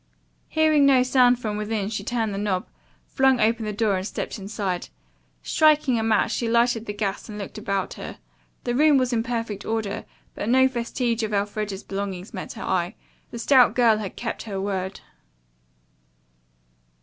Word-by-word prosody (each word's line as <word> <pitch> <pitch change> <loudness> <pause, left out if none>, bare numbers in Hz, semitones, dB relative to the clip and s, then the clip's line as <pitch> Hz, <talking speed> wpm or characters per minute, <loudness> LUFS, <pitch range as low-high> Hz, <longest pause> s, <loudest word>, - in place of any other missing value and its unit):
Hearing 310 -2 +4
no 260 -2 +5
sound 250 -1 +4
from 215 -3 -3
within 210 -1 -2
she 210 -2 -4
turned 225 -1 -1
the 195 - -3
knob, 195 -3 -1 0.4
flung 265 -2 +3
open 225 0 +2
the 210 - -2
door 210 -2 +1
and 185 +2 -3
stepped - - -5
inside. 195 -2 -3 0.5
Striking 300 - +3
a - - -1
match, 220 -1 +2
she 235 - -1
lighted 235 -1 +2
the 205 - -3
gas 205 +1 -3
and 210 - -7
looked 205 +1 -7
about 195 -2 -2
her. - - -8 0.5
The 240 - -1
room 295 +2 +5
was 255 -1 +1
in 225 - +2
perfect 230 -4 -3
order, 220 -3 -3 0.3
but 210 - -4
no 260 +1 +5
vestige 235 -1 -2
of 215 -1 -1
Elfreda's 205 0 -2
belongings 195 -1 -5
met 185 - -6
her - - -7
eye. 180 +3 -1 0.3
The - - -7
stout 245 -1 +5
girl 230 -3 +4
had 200 -3 -6
kept 230 - -4
her 200 -4 -5
word. 190 -1 -3
220 Hz, 175 wpm, -24 LUFS, 200-245 Hz, 0.5 s, no